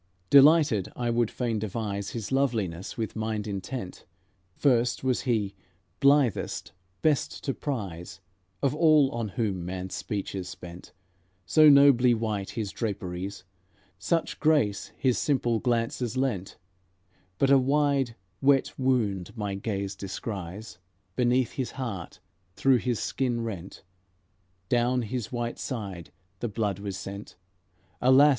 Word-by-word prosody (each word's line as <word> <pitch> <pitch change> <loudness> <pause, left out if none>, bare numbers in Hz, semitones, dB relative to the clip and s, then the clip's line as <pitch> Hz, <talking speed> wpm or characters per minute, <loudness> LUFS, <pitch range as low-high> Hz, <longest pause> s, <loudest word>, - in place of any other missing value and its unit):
Delighted, 140 - +6
I 120 -1 -1
would 115 -1 +2
fain 115 -3 -2
devise 100 -1 -3
His 115 -1 -5
loveliness, 110 -10 -1
with 110 -2 -3
mind 110 -1 -2
intent: 100 0 -5 0.5
First 125 -4 +2
was 130 -2 +1
He, 105 -4 +1 0.5
blithest, 140 -5 +2 0.3
best 150 -3 +1
to 135 - -1
prize, 95 - -5 0.4
Of 135 - +2
all 150 -3 +5
on 115 -2 -2
whom 95 -2 -2
man's 95 +1 -5
speech 100 -2 -4
is 95 -2 -4
spent; 90 0 -10 0.5
So 155 - +7
nobly 140 -4 +6
white 110 -3 -2
His 110 -4 -4
draperies, 95 -3 -4 0.6
Such 165 - -1
grace 110 -11 +2
His 130 -4 +1
simple 120 -5 +1
glances 120 0 -1
lent; 120 -9 -2 0.8
But 135 +5 +3
a 140 - +7
wide, 140 -2 +1 0.3
wet 135 -1 +3
wound 110 -6 0
my 105 -2 -2
gaze 100 0 -3
descries 100 0 -6 0.4
Beneath 125 0 +2
His 130 -3 -4
heart, 115 -10 -5 0.4
through 135 -2 +4
His 120 -2 -1
skin 120 -2 -1
rent; 100 -5 -6 0.8
Down 120 +2 +2
His 120 0 -4
white 120 -1 -3
side 100 - -5 0.3
the 120 - -2
blood 105 -3 -1
was 100 -2 -4
sent. 100 +2 -8 0.7
Alas! 130 +3 +7
115 Hz, 125 wpm, -27 LUFS, 100-130 Hz, 0.8 s, So